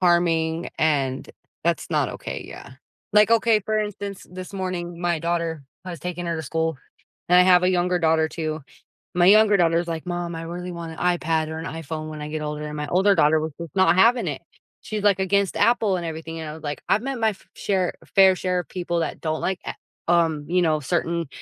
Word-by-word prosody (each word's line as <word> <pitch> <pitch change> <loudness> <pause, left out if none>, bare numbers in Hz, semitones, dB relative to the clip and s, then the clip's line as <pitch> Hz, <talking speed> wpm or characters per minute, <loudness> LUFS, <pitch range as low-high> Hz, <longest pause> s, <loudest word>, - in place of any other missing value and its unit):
harming, 170 -2 +2
and 140 -4 0 0.4
that's - - 0
not - - +1
OK, - - -6
yeah. - - -10 0.4
Like, 210 +1 +5
OK, 230 -1 +4
for 215 +2 -1
instance, 205 -2 -5
this 185 +1 -8
morning, 180 -3 -4
my 175 -2 0
daughter, 170 -2 -2 0.2
I 185 - -6
was 170 - -7
taking 175 0 -4
her 170 - -1
to 160 - -4
school, 160 0 -2 0.5
and 180 +1 +6
I - - +8
have 180 -1 +5
a 180 - +3
younger 180 0 +1
daughter 160 -1 +2
too. 155 -2 -4 0.5
My 175 - +4
younger 210 +1 +6
daughter 170 -2 +3
is 175 - -4
like, 165 0 -4
"Mom, 175 -1 -3
I 165 - -5
really 175 +2 -6
want 170 -1 -6
an - - -12
iPad 165 -3 +1
or 160 - -5
an 160 - -6
iPhone 160 -1 -5
when 155 -1 -7
I 150 - -5
get 155 0 -4
older," 150 0 -4
and 150 - -6
my 150 0 -3
older 195 +4 +3
daughter 155 0 +4
was 155 0 -3
just 170 +2 -8
not 190 -2 +4
having 230 +6 +4
it. - - -3 0.4
She's, 215 -1 -4
like, 200 -2 +4
against 195 0 +1
Apple 220 -5 +3
and 175 - -4
everything, 165 0 -6
and 160 - -5
I - - -6
was 160 - -12
like 145 -1 -5
I've 210 - +3
met 270 -2 -3
my 220 -1 +3
f 195 - -15
share 190 -3 0 0.2
fair 190 -1 +7
share 180 0 -1
of 175 - -7
people 175 -2 -2
that 160 - -3
don't 155 -1 -2
like 190 0 -1
A - - -4 0.3
um, 165 -4 +2
you 180 +1 +2
know, 155 -3 +2
certain 170 +2 -1
175 Hz, 225 wpm, -23 LUFS, 160-185 Hz, 0.5 s, I